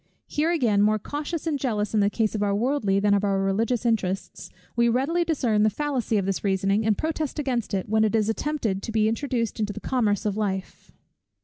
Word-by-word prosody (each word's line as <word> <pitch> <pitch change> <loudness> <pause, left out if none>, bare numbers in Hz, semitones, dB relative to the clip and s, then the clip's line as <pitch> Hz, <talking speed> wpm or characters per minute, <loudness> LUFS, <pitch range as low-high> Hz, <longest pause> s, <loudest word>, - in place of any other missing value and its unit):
Here 305 +2 0
again, 240 -12 +2
more 215 +1 +3
cautious 295 - -4
and 305 -4 -1
jealous 215 -6 -1
in 215 - +3
the 200 0 +3
case 215 0 0
of 215 - -2
our 200 -1 +1
worldly, 220 -4 +1
than 205 0 +3
of 200 0 +2
our 200 -1 +1
religious 225 +6 0
interests, 195 -5 -1 0.3
we 235 0 +3
readily 280 +9 +1
discern 250 -10 +1
the 215 - +4
fallacy 250 -2 -1
of 195 - 0
this 195 -1 -2
reasoning 195 +1 +1
and 215 - +2
protest 315 -2 -2
against 255 -6 -1
it, 190 - -2
when 220 +1 +2
it 220 +1 +1
is 215 -2 +2
attempted 225 -4 -1
to 225 - -5
be 215 -1 +2
introduced 230 -1 -2
into 210 -1 -1
the - - -7
commerce 215 -6 0
of 205 -2 0
life. 195 -3 -4
220 Hz, 215 wpm, -25 LUFS, 205-260 Hz, 0.3 s, the